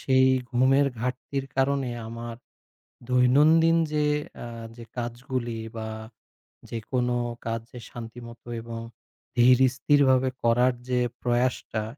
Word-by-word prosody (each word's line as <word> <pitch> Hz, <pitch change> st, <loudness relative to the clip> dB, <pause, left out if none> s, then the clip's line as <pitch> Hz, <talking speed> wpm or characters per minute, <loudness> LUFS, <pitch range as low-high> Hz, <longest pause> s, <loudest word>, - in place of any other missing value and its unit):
সেই 130 Hz, -1 st, +4 dB, 0.3 s
ঘুমের 135 Hz, +3 st, +4 dB
ঘাটতির 130 Hz, +2 st, -3 dB
কারণে 135 Hz, -1 st, +1 dB, 0.2 s
আমার 115 Hz, 0 st, -6 dB, 0.7 s
দৈনন্দিন 150 Hz, +7 st, +5 dB
যে 150 Hz, -1 st, +1 dB, 0.4 s
আ -, -, -6 dB, 0.3 s
যে 120 Hz, -, -9 dB
কাজগুলি 120 Hz, 0 st, -3 dB, 0.2 s
বা 110 Hz, 0 st, -4 dB, 0.8 s
যেকোনো 120 Hz, +2 st, -1 dB, 0.3 s
কাজ 115 Hz, 0 st, -2 dB
যে 125 Hz, -, -9 dB
শান্তিমত 115 Hz, 0 st, -9 dB, 0.2 s
এবং 115 Hz, 0 st, -7 dB, 0.6 s
ধীরস্থিরভাবে 130 Hz, +1 st, +4 dB
করার 120 Hz, +2 st, +4 dB, 0.2 s
যে 125 Hz, -1 st, +2 dB, 0.2 s
প্রয়াসটা, 120 Hz, -2 st, 0 dB
125 Hz, 100 wpm, -26 LUFS, 120-130 Hz, 0.8 s, দৈনন্দিন